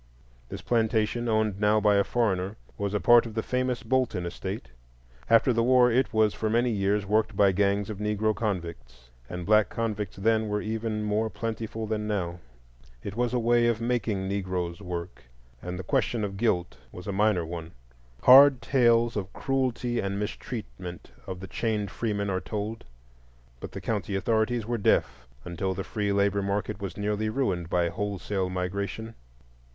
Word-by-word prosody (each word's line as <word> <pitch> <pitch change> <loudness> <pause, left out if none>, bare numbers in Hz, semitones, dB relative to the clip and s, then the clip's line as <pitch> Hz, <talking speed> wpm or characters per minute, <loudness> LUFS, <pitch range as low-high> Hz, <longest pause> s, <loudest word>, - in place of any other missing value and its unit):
This - - -7
plantation, 115 0 +1
owned 110 -3 +1
now 105 +1 +3
by 105 0 +4
a 100 - +4
foreigner, 100 -4 0 0.2
was 100 -1 -2
a - - +2
part 120 +6 +6
of 110 - -10
the 110 - -1
famous 125 -1 -1
Bolton 125 -9 0
estate. 85 -6 -5 0.6
After 115 +2 +5
the 115 - +2
war 125 0 +5
it 130 +2 +2
was 110 -2 +3
for 110 - -2
many 120 +2 +2
years 100 0 0
worked 105 0 +1
by 100 -1 +5
gangs 100 +1 +1
of 105 -3 -6
Negro 105 +1 0
convicts,—and 85 - -6
black 110 0 +4
convicts 110 -3 -3
then 110 +2 +1
were 105 0 0
even 110 0 -3
more 105 +1 0
plentiful 110 0 -4
than 105 0 -2
now; 90 -5 -2 0.6
it 100 - -6
was 120 0 0
a 125 - +1
way 120 0 +3
of 115 -2 +1
making 115 -5 -1
Negroes 90 -2 -3
work, 90 -1 -6 0.4
and 90 0 -5
the 95 - -5
question 110 +4 0
of 100 -1 -3
guilt 95 -5 0
was 90 - -10
a 100 - -3
minor 100 -3 +2
one. 80 0 -7 0.5
Hard 135 +1 +9
tales 120 -1 +3
of 100 -2 -3
cruelty 125 -3 -1
and 100 0 -2
mistreatment 100 -4 -6 0.2
of 95 -1 -5
the 95 - -7
chained 105 -3 -2
freemen 100 -3 -2
are 95 0 -1
told, 110 +1 -5 0.7
but - - -7
the - - -5
county 100 - -2
authorities 110 +3 +1
were 120 0 -2
deaf 60 -9 +1 0.2
until 95 +2 -2
the 95 - -3
free 105 0 -2
labor 100 0 +2
market 100 +1 -2
was 95 -4 -5
nearly 105 +1 -1
ruined 95 -9 -1
by 90 -1 +2
wholesale 100 -1 -2
migration. 100 +5 -3
105 Hz, 170 wpm, -27 LUFS, 95-115 Hz, 0.7 s, Hard